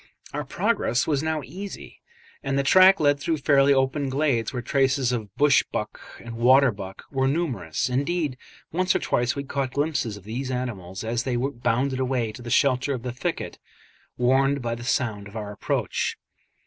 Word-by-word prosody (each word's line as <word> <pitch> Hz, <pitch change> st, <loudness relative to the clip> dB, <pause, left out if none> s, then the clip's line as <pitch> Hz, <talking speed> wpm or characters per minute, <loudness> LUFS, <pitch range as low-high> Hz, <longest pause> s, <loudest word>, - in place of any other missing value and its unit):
Our -, -, -2 dB
progress 120 Hz, +2 st, 0 dB
was 145 Hz, -3 st, +1 dB
now 160 Hz, -2 st, -1 dB
easy, 190 Hz, +9 st, -9 dB, 0.4 s
and 135 Hz, -1 st, -1 dB
the 140 Hz, -, +2 dB
track 185 Hz, +6 st, +7 dB
led 145 Hz, -1 st, +3 dB
through 155 Hz, +3 st, -1 dB
fairly 140 Hz, -1 st, +4 dB
open 135 Hz, +1 st, +1 dB
glades 130 Hz, -5 st, 0 dB
where 125 Hz, -2 st, -4 dB
traces 135 Hz, -2 st, +2 dB
of 110 Hz, -4 st, -3 dB
bush 145 Hz, -1 st, +4 dB
buck -, -, -4 dB, 0.2 s
and 115 Hz, -1 st, -9 dB
water 130 Hz, +2 st, +5 dB
buck 95 Hz, -2 st, -9 dB
were 135 Hz, -1 st, +1 dB
numerous; 125 Hz, -, -1 dB
indeed 145 Hz, +3 st, -1 dB, 0.4 s
once 185 Hz, +3 st, +1 dB
or -, -, +3 dB
twice 120 Hz, +1 st, 0 dB
we 140 Hz, -, -3 dB
caught 135 Hz, -1 st, -3 dB
glimpses 145 Hz, -7 st, -1 dB
of 100 Hz, -, -14 dB
these 120 Hz, +6 st, -4 dB
animals 105 Hz, -8 st, -4 dB
as 115 Hz, +1 st, -1 dB
they 130 Hz, -1 st, -2 dB
bounded 130 Hz, +1 st, 0 dB
away 125 Hz, -4 st, 0 dB
to 125 Hz, -, -11 dB
the 120 Hz, -, -7 dB
shelter 130 Hz, +2 st, +2 dB
of 120 Hz, -, -7 dB
the 125 Hz, -2 st, -4 dB
thicket, 125 Hz, -, -4 dB, 0.6 s
warned 135 Hz, +3 st, +3 dB
by 120 Hz, -2 st, -2 dB
the 120 Hz, +1 st, -7 dB
sound 110 Hz, -5 st, -1 dB
of 105 Hz, +2 st, -9 dB
our 105 Hz, -1 st, -5 dB
approach. 105 Hz, -, -2 dB
130 Hz, 180 wpm, -25 LUFS, 120-140 Hz, 0.6 s, track